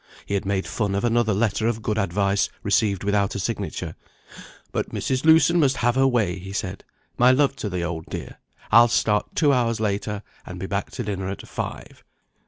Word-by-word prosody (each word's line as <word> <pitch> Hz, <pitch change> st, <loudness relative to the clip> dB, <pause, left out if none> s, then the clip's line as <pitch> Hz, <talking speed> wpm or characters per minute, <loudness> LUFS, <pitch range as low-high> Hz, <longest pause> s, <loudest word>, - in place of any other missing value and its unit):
He -, -, -4 dB
had 100 Hz, -1 st, -1 dB
made 100 Hz, -1 st, 0 dB
fun 100 Hz, -3 st, -2 dB
of 100 Hz, -, -1 dB
another 120 Hz, -1 st, +2 dB
letter 110 Hz, +1 st, +1 dB
of 115 Hz, -2 st, -2 dB
good 110 Hz, 0 st, 0 dB
advice, 100 Hz, +1 st, +1 dB
received 100 Hz, -2 st, +1 dB
without 100 Hz, -1 st, +1 dB
a -, -, -2 dB
signature. -, -, -4 dB, 0.8 s
"But -, -, -2 dB
Mrs. 130 Hz, 0 st, -2 dB
Lewson 160 Hz, +2 st, +6 dB
must 140 Hz, -3 st, +3 dB
have 120 Hz, +1 st, +2 dB
her 135 Hz, +1 st, +3 dB
way," 105 Hz, -8 st, +1 dB
he 95 Hz, +2 st, -8 dB
said. 95 Hz, -1 st, -4 dB, 0.4 s
"My 125 Hz, +1 st, +6 dB
love 135 Hz, +1 st, +3 dB
to 105 Hz, -, -3 dB
the 90 Hz, -2 st, -2 dB
old 85 Hz, -1 st, -4 dB
dear -, -, -7 dB, 0.3 s
I'll 115 Hz, +2 st, +8 dB
start 105 Hz, -2 st, 0 dB
two 145 Hz, -3 st, +4 dB
hours 115 Hz, -3 st, +1 dB
later, 105 Hz, 0 st, -2 dB, 0.2 s
and 90 Hz, 0 st, -8 dB
be 95 Hz, -, -4 dB
back 100 Hz, +1 st, -2 dB
to 125 Hz, -, -4 dB
dinner 95 Hz, -3 st, -3 dB
at 95 Hz, -, -7 dB
five." -, -, -6 dB
105 Hz, 195 wpm, -23 LUFS, 100-120 Hz, 0.8 s, I'll